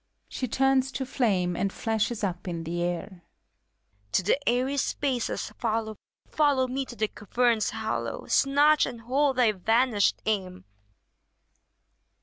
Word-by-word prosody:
(She 255 - -4
turns 270 +2 +2
to 265 - -3
flame 190 -9 0
and 200 +2 -1
flashes 220 +1 -1
up 180 -2 -3
in 170 -2 -4
the 170 +2 -3
air.) 175 +1 -4 0.9
To 190 - +2
the 275 +9 +1
airy 255 +4 0
spaces 260 -5 -1
follow. 220 -1 -1 0.3
Follow 285 -4 +2
me 265 +1 -3
to 220 -3 -2
caverns 225 +2 0
hollow. - - -3
Snatch 290 +2 +4
and 235 -2 -7
hold 270 +4 +1
thy 245 -3 +4
vanished 220 +2 +2
aim! 190 -4 -2
230 Hz, 130 wpm, -27 LUFS, 200-265 Hz, 0.9 s, Snatch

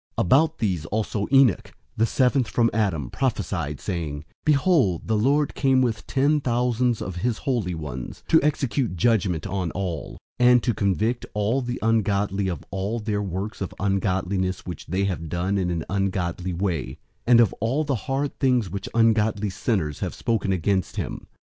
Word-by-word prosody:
001:014 - - +2
About 155 - +3
these 90 -8 -1
also 105 0 -2
Enoch, 135 -7 +4 0.2
the 115 - +2
seventh 125 0 +2
from 115 +1 +2
Adam, 85 - 0
prophesied, 90 - -2
saying, 80 -6 -4 0.2
"Behold, 140 - +2
the 110 - +1
Lord 140 +7 +2
came 135 -2 +3
with 115 -4 -2
ten 145 +3 +2
thousands 120 -1 +1
of 90 -1 -6
his 115 +4 -1
holy 115 - -1
ones, 70 -6 -7
001:015 - - -38
to 160 - +6
execute 140 -7 0
judgment 95 -4 +1
on 95 -3 -2
all, 90 -5 -4 0.2
and 125 -1 +5
to 120 - +1
convict 110 +5 0
all 105 +6 +1
the 125 0 -3
ungodly 100 -3 +1
of 85 -6 -4
all 100 +4 -2
their 105 -2 -1
works 100 +3 -4
of 95 - -4
ungodliness 95 -2 -1
which 90 - -7
they 95 +4 0
have 85 -5 -2
done 90 +4 0
in 90 -2 0
an 85 -2 -2
ungodly 95 -2 -1
way, 85 -8 -2 0.3
and 120 -1 +7
of 115 -5 +4
all 125 +9 0
the 145 -2 -1 0.2
hard 135 +1 -1
things 125 -8 +2
which 100 - -5
ungodly 110 -3 +2
sinners 90 - -1
have - - -3
spoken 110 -4 -1
against 95 0 0
him." - - -5
105 Hz, 170 wpm, -24 LUFS, 90-120 Hz, 0.3 s, and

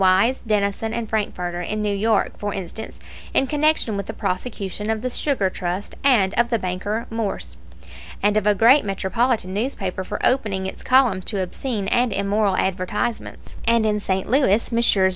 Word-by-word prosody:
Wise, 195 +7 +4
Denison, 210 0 0
and 235 -1 -3
Frankfurter, 180 -5 -2
in 210 +4 -3
New 205 -1 0
York, 220 +3 +1
for 205 0 -3
instance, 195 +3 -7 0.4
in 270 - +4
connection 295 -5 +1
with 200 -1 -4
the - - -5
prosecution 205 +1 -3
of 220 +1 -1
the 255 - -2
Sugar 260 -8 +1
Trust 180 +3 -4
and 225 -9 +4
of 235 0 +3
the 235 - +2
banker 205 +4 -3
Morse, 225 -3 -3 0.7
and 205 0 +3
of 210 -1 +1
a 210 - +4
great 245 +8 +6
metropolitan 200 +1 0
newspaper 200 -4 -2
for 205 +2 -5
opening 210 -7 +1
its 190 - -6
columns 250 -8 +3
to 200 -4 -1
obscene 205 +2 -3
and 245 -1 +2
immoral 200 0 +1
advertisements; 190 +5 -3
and 230 -1 +4
in 210 -1 +1
St. 190 -2 -1
Louis 230 -4 +2
Messrs. 220 -5 +3
210 Hz, 170 wpm, -22 LUFS, 190-235 Hz, 0.7 s, great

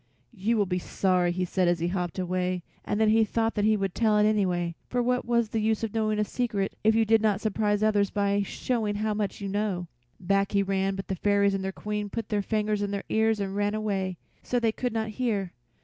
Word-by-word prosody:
"You 220 +2 0
will 205 - +3
be 180 -1 -1
sorry," 180 -1 +1
he 180 +1 -1
said 180 0 +1
as 175 0 +3
he 170 +1 -1
hopped 180 -2 -3
away, 180 -1 -1 0.2
and 205 - -2
then 220 -1 +4
he 225 +1 +5
thought 225 +1 0
he 215 +1 +3
would 195 -2 -2
tell 215 -2 +2
it, 210 - +4
anyway, 180 -5 +1 0.2
for 245 - -1
what 250 +1 +1
was 235 -2 +1
the 220 -1 -1
use 220 +1 0
of 225 - -2
knowing 215 -1 0
a 210 - +2
secret 210 -5 -2
if 220 +1 +4
you 225 0 +3
did 220 0 +4
not 210 -3 +2
surprise 210 -1 0
others 205 -2 +3
by 200 0 +1
showing 215 +1 -2
how 215 +1 0
much 205 -1 -3
you 200 - -3
know. 195 -3 -2 0.3
Back 195 +2 +1
he 200 0 +3
ran, 195 0 0
but 195 - -6
the - - -2
fairies 200 +1 +2
and 195 -1 -2
their 190 - -2
Queen 210 +1 -4
put 225 0 -5
their 210 -1 +1
fingers 210 0 -1
in 205 - -1
their 200 0 -3
ears 220 0 +2
and 195 -1 -3
ran 205 +1 0
away, 195 -4 -2 0.2
so 245 - 0
they 230 -2 +2
could 245 +2 -2
not 220 0 -2
hear. 210 -5 -2
205 Hz, 240 wpm, -27 LUFS, 195-220 Hz, 0.3 s, he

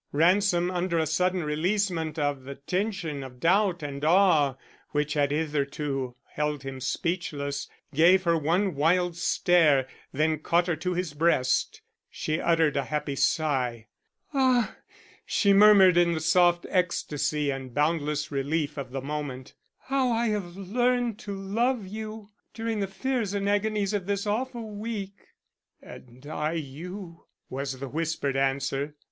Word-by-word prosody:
Ransom, 175 +3 +3
under 175 -1 -1
a 160 - +2
sudden 180 +3 +1
releasement 165 0 -1
of 145 -3 -1
the 140 +1 -7
tension 180 -2 -3
of 130 -2 -10
doubt 180 +1 +2
and 140 0 -5
awe 160 -5 +4 0.4
which 150 0 0
had 145 -2 +2
hitherto 140 -3 -2 0.2
held 150 -2 -2
him 135 -1 -6
speechless, 145 -3 -2 0.2
gave 175 +6 +5
her 170 -2 +3
one 170 +5 +1
wild 170 +4 +2
stare, 165 -6 +3 0.2
then 155 +2 +1
caught 170 +3 +2
her 175 -2 0
to 180 +3 -2
his 175 -4 -2
breast. 145 -4 +1 0.3
She 155 +1 -2
uttered 165 -4 +2
a 140 - 0
happy 150 -2 -2
sigh. 130 -6 0 0.4
"Ah!" 260 -4 +2 0.5
she 200 -2 +2
murmured 195 -3 +7
in 175 -1 +4
the 160 - -1
soft 175 +1 +3
ecstasy 150 -5 0
and 135 -1 -6
boundless 150 +1 0
relief 145 +1 -1
of 135 -2 -5
the 135 +1 -4
moment, 140 -2 -5 0.3
"how 265 -2 0
I 230 0 +1
have 190 -4 -3
learned 240 +3 0
to 200 -1 -6
love 225 +4 0
you 215 +1 -7 0.2
during 225 -1 -2
the 200 - -1
fears 210 +1 -2
and 200 0 -1
agonies 205 0 0
of 200 -3 -2
this 200 0 -1
awful 235 +2 -2
week." 205 -2 -6 0.5
"And 125 +2 -13
I 150 +1 -2
you," 170 +4 -7 0.2
was 135 0 -4
the 135 - -5
whispered 155 -2 -2
answer. 135 +2 -1
165 Hz, 145 wpm, -27 LUFS, 145-195 Hz, 0.5 s, murmured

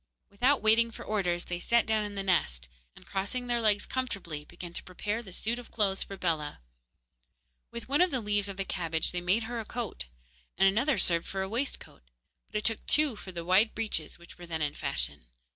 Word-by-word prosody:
Without 250 +7 +3
waiting 225 +2 +6
for 230 - -10
orders, 180 -5 0
they 175 0 -3
sat 235 +6 +3
down 220 -1 +2
in 205 -1 -5
the 195 - -2
nest 65 - +1 0.3
and, - - -15
crossing 200 +6 -2
their 240 -1 +1
legs 210 -2 +4
comfortably, 195 - -3
began 175 +2 -9
to - - -3
prepare 205 +5 -3
the 195 -5 -11
suit 225 +6 -1
of 245 - -11
clothes 195 -3 +1
for 195 - -5
Bellah. 160 - -1 1.1
With 235 - -7
one 285 +5 +3
of 365 - +6
the 265 - 0
leaves 205 -2 +1
of 195 - -6
the 195 - -1
cabbage 165 -4 0
they 175 - -2
made 190 +6 +2
her 235 +1 -4
a - - -3
coat, 225 - -4 0.5
and 195 - +6
another 240 +9 +3
served 170 -1 +2
for 190 0 -2
a - - -3
waistcoat; 240 +7 -3 0.5
but - - -15
it 210 - -1
took 225 -1 +2
two 300 -5 +4
for 195 -2 -9
the 170 -2 -5
wide 190 +5 +4
breeches 210 -9 -2
which 170 0 -15
were 175 - -9
then 160 -2 -1
in 145 -1 0
fashion. - - -2
200 Hz, 215 wpm, -30 LUFS, 175-230 Hz, 1.1 s, waiting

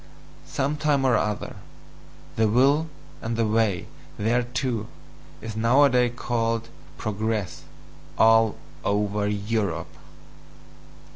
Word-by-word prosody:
Some 145 +3 -1
time 145 -3 +1
or 125 -3 +4
other 105 -1 -2 0.8
the 110 0 +3
will 140 +8 +3 0.3
and 115 0 -3
the 115 - +2
way 105 -4 +1 0.3
THERETO 120 +1 -1 0.5
is 110 -1 -6
nowadays 125 +1 +4
called 115 -2 -1 0.3
"progress" 110 -2 -3 0.5
all 115 -1 +5 0.3
over 105 0 0
Europe. 100 -5 -2
115 Hz, 90 wpm, -25 LUFS, 105-125 Hz, 0.8 s, all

